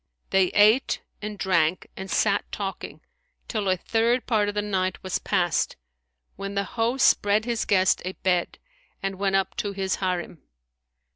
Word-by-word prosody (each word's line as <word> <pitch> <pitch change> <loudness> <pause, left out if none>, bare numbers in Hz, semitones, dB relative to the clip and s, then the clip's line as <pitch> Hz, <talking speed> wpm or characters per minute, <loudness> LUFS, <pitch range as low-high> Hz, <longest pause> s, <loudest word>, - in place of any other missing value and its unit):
They 190 -1 +5
ate 215 +6 +4 0.2
and 210 0 -5
drank 180 -3 +1
and 190 0 -7
sat 200 +2 +1
talking, 195 -2 -5 0.5
till 210 -4 -1
a 185 - +2
third 230 +5 +1
part 210 -4 +1
of 205 - -5
the 210 - +1
night 185 -2 -1
was 185 -1 -2
past 175 -3 0 0.6
when 195 +1 -5
the 200 - +1
host 240 +3 +2
spread 205 +2 +3
his 235 -2 -1
guest 190 -2 +3
a 185 +1 -4
bed 180 -2 -1 0.5
and 195 -1 -3
went 195 -1 +1
up 195 -1 0
to 205 -1 -2
his 190 -1 -1
Harim. 180 -4 -3
195 Hz, 160 wpm, -25 LUFS, 185-210 Hz, 0.6 s, They